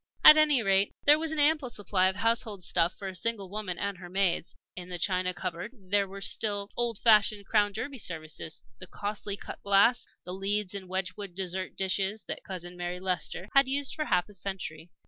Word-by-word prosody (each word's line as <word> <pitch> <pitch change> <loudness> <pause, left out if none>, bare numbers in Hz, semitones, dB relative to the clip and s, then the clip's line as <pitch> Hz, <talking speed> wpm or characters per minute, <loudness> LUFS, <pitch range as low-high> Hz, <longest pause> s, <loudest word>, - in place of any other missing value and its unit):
At 305 - +11
any 300 -5 +4
rate, 195 0 +2
there 295 +1 +7
was 320 0 -1
an 315 - -3
ample 295 -2 +3
supply 200 -4 +1
of 190 - 0
household 220 -2 0
stuff 170 0 +1
for 195 - -6
a 190 - -5
single 200 -1 -2
woman 205 -4 -4
and 200 -2 -3
her 175 -1 -10
maids. 185 -2 0 0.2
In 180 0 -8
the 180 - -3
china 185 +1 +1
cupboard 180 +5 -5
there 200 0 0
were 195 +1 -9
still 205 0 +1
the - - -26
old 240 -2 -1
fashioned 210 -2 +4
Crown 205 0 +2
Derby 265 +5 -5
services, 160 -3 -6 0.2
the 185 - -9
costly 205 +1 -4
cut - - -9
glass, 200 +5 +4 0.2
the 180 - -6
Leeds 195 +1 0
and 190 -2 -6
Wedgewood 185 0 -4
dessert 185 0 -3
dishes 195 +2 -1
that - - -5
Cousin 180 -2 -7
Mary 175 0 -4
Leicester 180 0 -3
had 275 -1 +5
used 280 +1 +1
for 305 - -3
half 180 -7 +1
a 205 - -15
century. 180 -4 -5
195 Hz, 205 wpm, -29 LUFS, 185-215 Hz, 0.2 s, At